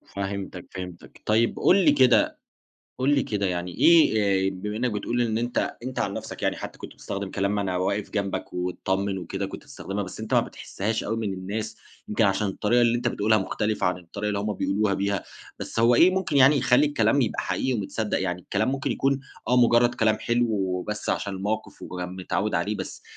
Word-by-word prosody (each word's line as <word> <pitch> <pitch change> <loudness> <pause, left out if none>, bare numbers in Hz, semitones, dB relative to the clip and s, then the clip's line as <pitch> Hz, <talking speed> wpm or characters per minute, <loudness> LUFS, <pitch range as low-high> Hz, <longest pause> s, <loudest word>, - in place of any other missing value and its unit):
فهمتك، 95 -2 -4
فهمتك، 90 -2 -9
طيب 115 +2 +2
قُل - - +5
لي 150 - +7
كده 130 -3 +4 0.6
قُل 140 +3 +3
لي 135 - +2
كده 100 -2 -1
يعني 90 0 -2
إيه، 160 -10 +6 0.3
آآ، - - -1
بما 105 +3 -5
إنك 125 +1 0
بتقول 115 +4 -2
إن 110 -1 0
أنت 120 +1 -1
أنت 130 +1 -5
عن - - -1
نفْسك - - -7
يعني - - +1
حتّى - - -8
كنت - - -9
بتستخدم 100 -1 -5
كلام 100 +1 0
ما 100 - 0
أنا 95 -2 -1
واقف 100 +3 -1
جنبك، 100 -2 -3
واطّمن 95 +2 -2
وكده، 85 - -4
كنت - - -8
بتستخدمها 100 +1 -5
بس 95 +3 -8
أنت 110 - -2
ما - - +6
بتحسّهاش 110 +3 -4
أوي 110 - -2
من 105 -4 -2
الناس، 105 +4 -4 0.3
يمكن 105 +1 +2
عشان 100 +1 +2
الطريقة 105 +5 +1
اللي 120 0 +3
أنت 120 0 0
بتقولها 110 0 +2
مختلفة 105 +1 -1
عن 90 0 0
الطريقة 100 +4 -5
اللي 105 -1 -1
هُم 105 +1 -1
بيقولوها 100 +1 0
بيها، 100 0 -1 0.3
بس - - -6
هو 120 +1 +5
إيه 175 +8 +6
ممكن 180 -6 0
يعني 140 +2 +7
يخلّي 125 +4 +4
الكلام 140 -1 +2
يبقى 115 - 0
حقيقي 130 - -1
ومتصدق 105 -1 -2
يعني، 90 -1 -2
الكلام 105 +6 -1
ممكن 135 0 -1
يكون 135 0 +1 0.3
آه 125 - +3
مجرد 120 0 +4
كلام 110 -1 +2
حلو 120 +1 +1
وبس 95 +1 -2
عشان 100 - -2
الموقف 105 +3 -4
ومتعود 90 0 -3
عليه، - - 0
بس - - -7
105 Hz, 200 wpm, -25 LUFS, 95-120 Hz, 0.6 s, لي